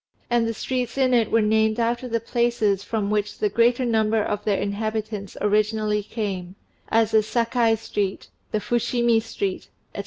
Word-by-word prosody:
And 235 -1 +3
the 230 - -1
streets 250 +2 -3
in 260 -2 +3
it 230 -3 +3
were 225 -1 +4
named 220 +1 +2
after 235 +2 0
the 230 -1 0
places 230 -4 0
from 210 -1 -2
which 210 -1 -1
the 210 - +1
greater 240 +4 +2
number 220 -1 +2
of 210 0 -3
their 205 -2 +1
inhabitants 215 0 -3
originally 210 0 +1
came, 195 -4 -5 0.3
as 225 -1 +2
the 220 - +5
"Sakai 230 +1 +1
Street," 205 -3 -3 0.2
the 215 - 0
"Fushimi 235 0 +1
Street," 385 - -4 0.3
&c. - - -5
220 Hz, 165 wpm, -23 LUFS, 210-235 Hz, 0.3 s, the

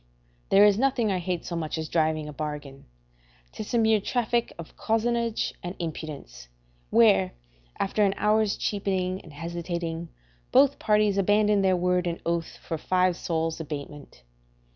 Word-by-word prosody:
There 200 +1 +7
is 205 0 +4
nothing 250 -5 +2
I 185 - 0
hate 180 -1 -3
so 170 - -4
much 160 -1 -3
as 160 0 -3
driving 155 -1 0
a 150 - -7
bargain; 145 -1 -6 0.7
'tis 215 +3 -5
a - - +4
mere 220 -2 +3
traffic 235 +1 0
of 170 -2 -10
cozenage 230 0 0
and 175 +2 -6
impudence, 155 - -7 0.4
where, 95 - +4 0.5
after 210 +2 +1
an 195 -1 +2
hour's 210 -1 +2
cheapening 190 -2 -1
and 160 - -14
hesitating, 170 +1 -4 0.4
both 280 +1 +4
parties 210 -2 +2
abandon 205 +1 +3
their 190 -1 +3
word 180 0 +1
and 170 0 -3
oath 170 -1 -2
for 165 - -3
five 185 +1 +2
sols' 165 -1 -2
abatement. 145 -2 -8
180 Hz, 150 wpm, -26 LUFS, 160-210 Hz, 0.7 s, There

